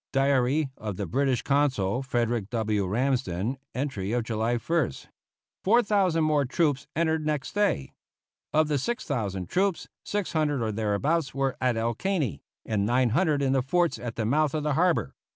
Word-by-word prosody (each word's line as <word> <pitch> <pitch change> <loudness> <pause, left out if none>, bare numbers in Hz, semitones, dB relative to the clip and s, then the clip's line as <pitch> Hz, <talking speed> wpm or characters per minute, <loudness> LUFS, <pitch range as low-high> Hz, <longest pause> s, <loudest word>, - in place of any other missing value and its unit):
(Diary 135 +1 +2
of 105 -4 -5
the 100 - -2
British 130 - 0
Consul, 130 -7 +1
Frederick 120 -5 -1
W. 110 -4 0
Ramsden, 125 0 -1 0.2
entry 120 -7 -2
of 120 -1 +1
July 115 +1 0
1st.) 150 - -1 0.6
Four 235 +5 +4
thousand 190 -6 +2
more 150 -2 +3
troops 140 0 0
entered 160 0 +1
next 150 -3 -2
day. 205 - 0 0.6
Of 155 0 +3
the 150 -2 0
6,000 115 - -2
troops, 190 - 0 0.2
600 155 - 0
or 110 - -1
thereabouts 115 +10 0
were 135 -1 0
at 125 -3 +1
El 115 +1 0
Caney, 150 - -1 0.2
and 105 -2 0
900 130 - +2
in 135 -1 +2
the 135 - +3
forts 170 +6 +1
at 120 -2 -5
the 110 - -1
mouth 150 +5 +2
of 155 - -1
the 150 -1 +1
harbor. 175 +3 +1
135 Hz, 160 wpm, -27 LUFS, 115-155 Hz, 0.6 s, Four